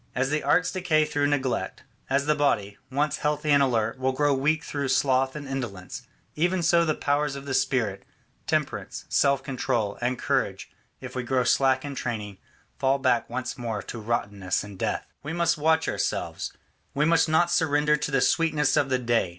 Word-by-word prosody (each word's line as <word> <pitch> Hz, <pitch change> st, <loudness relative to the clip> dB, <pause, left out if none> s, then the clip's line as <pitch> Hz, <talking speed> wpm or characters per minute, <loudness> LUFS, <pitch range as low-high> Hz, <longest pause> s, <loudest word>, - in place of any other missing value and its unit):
As 130 Hz, +3 st, 0 dB
the 150 Hz, 0 st, +1 dB
arts 180 Hz, +6 st, +2 dB
decay 170 Hz, -5 st, +2 dB
through 145 Hz, -1 st, 0 dB
neglect, 135 Hz, -3 st, -1 dB, 0.3 s
as 140 Hz, +1 st, +1 dB
the 150 Hz, -, +3 dB
body, 105 Hz, -9 st, 0 dB
once 145 Hz, +3 st, 0 dB
healthy 150 Hz, 0 st, 0 dB
and 140 Hz, -1 st, +5 dB
alert, 115 Hz, -2 st, +1 dB
will 130 Hz, 0 st, 0 dB
grow 145 Hz, +1 st, +2 dB
weak 150 Hz, +4 st, +1 dB
through 140 Hz, -2 st, -3 dB
sloth 130 Hz, 0 st, +2 dB
and 145 Hz, -2 st, -6 dB
indolence, 120 Hz, -9 st, -6 dB, 0.3 s
even 175 Hz, +3 st, +1 dB
so 170 Hz, +1 st, +4 dB
the 155 Hz, -2 st, 0 dB
powers 145 Hz, 0 st, 0 dB
of 140 Hz, 0 st, -8 dB
the 140 Hz, -, -3 dB
spirit, 125 Hz, -6 st, 0 dB, 0.5 s
temperance, -, -, -2 dB
self 140 Hz, -1 st, +2 dB
control, 120 Hz, -6 st, -2 dB
and 125 Hz, +1 st, 0 dB
courage, -, -, -1 dB, 0.3 s
if -, -, -8 dB
we 130 Hz, -, -1 dB
grow 125 Hz, +1 st, +1 dB
slack 130 Hz, +2 st, +2 dB
in 145 Hz, -, -5 dB
training, 105 Hz, -7 st, -4 dB, 0.4 s
fall 135 Hz, +1 st, +2 dB
back 130 Hz, -4 st, +1 dB
once 130 Hz, +2 st, -4 dB
more 115 Hz, -4 st, -3 dB
to 115 Hz, -, -7 dB
rottenness 100 Hz, -5 st, -1 dB
and 100 Hz, -2 st, -11 dB
death. -, -, -1 dB, 0.2 s
We 150 Hz, +3 st, -5 dB
must 170 Hz, -2 st, +1 dB
watch 160 Hz, +1 st, +2 dB
ourselves; -, -, -2 dB, 0.4 s
we 150 Hz, +2 st, +2 dB
must 165 Hz, 0 st, +3 dB
not 175 Hz, +2 st, +3 dB
surrender 150 Hz, -3 st, +3 dB
to 150 Hz, -, -3 dB
the 135 Hz, -2 st, +1 dB
sweetness 155 Hz, -3 st, +2 dB
of 135 Hz, -, +2 dB
the 130 Hz, -, +2 dB
day. 120 Hz, -6 st, +1 dB
135 Hz, 185 wpm, -26 LUFS, 125-150 Hz, 0.5 s, and